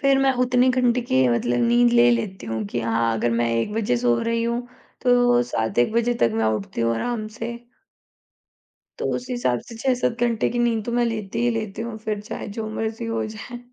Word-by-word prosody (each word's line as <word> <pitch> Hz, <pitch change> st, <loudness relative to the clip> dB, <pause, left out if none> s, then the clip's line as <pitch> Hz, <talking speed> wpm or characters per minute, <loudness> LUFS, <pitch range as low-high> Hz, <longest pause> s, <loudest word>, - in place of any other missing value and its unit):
फिर 275 Hz, -1 st, +4 dB
मैं 270 Hz, 0 st, +4 dB
उतनी 250 Hz, 0 st, +3 dB
घंटे 250 Hz, -1 st, +2 dB
की 130 Hz, -, +1 dB
मतलब 120 Hz, 0 st, +1 dB
नींद 120 Hz, 0 st, +4 dB
ले 120 Hz, 0 st, +6 dB
लेती 120 Hz, +7 st, -2 dB
हूँ 110 Hz, -1 st, -3 dB
कि 120 Hz, -, -1 dB
हाँ, 115 Hz, 0 st, +1 dB
अगर 120 Hz, +2 st, 0 dB
मैं 115 Hz, +1 st, +1 dB
1 115 Hz, -, -1 dB
बजे 205 Hz, -, +1 dB
सो 120 Hz, -1 st, +2 dB
रही 230 Hz, 0 st, 0 dB
हूँ, 235 Hz, +1 st, 0 dB, 0.4 s
तो 245 Hz, -1 st, +4 dB
7 110 Hz, -1 st, -1 dB
एक 120 Hz, -, +3 dB
बजे 235 Hz, +1 st, +1 dB
तक 115 Hz, -, +4 dB
मैं 110 Hz, -, +1 dB
उठती 105 Hz, +2 st, -6 dB
हूँ 115 Hz, 0 st, +2 dB
आराम 220 Hz, -, -2 dB
से। 230 Hz, 0 st, -3 dB, 1.5 s
तो -, -, -2 dB
उस 250 Hz, -, -6 dB
हिसाब 240 Hz, -, 0 dB
से 230 Hz, -, -9 dB
6-7 250 Hz, -1 st, 0 dB
घंटे 230 Hz, -3 st, +1 dB
की 240 Hz, -, -2 dB
नींद 230 Hz, -2 st, +1 dB
तो 235 Hz, -, -3 dB
मैं 240 Hz, 0 st, +2 dB
लेती 215 Hz, -4 st, -3 dB
ही 240 Hz, -, +3 dB
लेती 215 Hz, 0 st, -6 dB
हूँ, 230 Hz, -1 st, -5 dB
फिर 215 Hz, -1 st, -4 dB
चाहे 210 Hz, -, -6 dB
जो 220 Hz, -, -3 dB
मर्ज़ी 220 Hz, +1 st, -3 dB
हो 225 Hz, -1 st, -2 dB
जाए। 220 Hz, +3 st, -8 dB
220 Hz, 215 wpm, -23 LUFS, -, 1.5 s, ले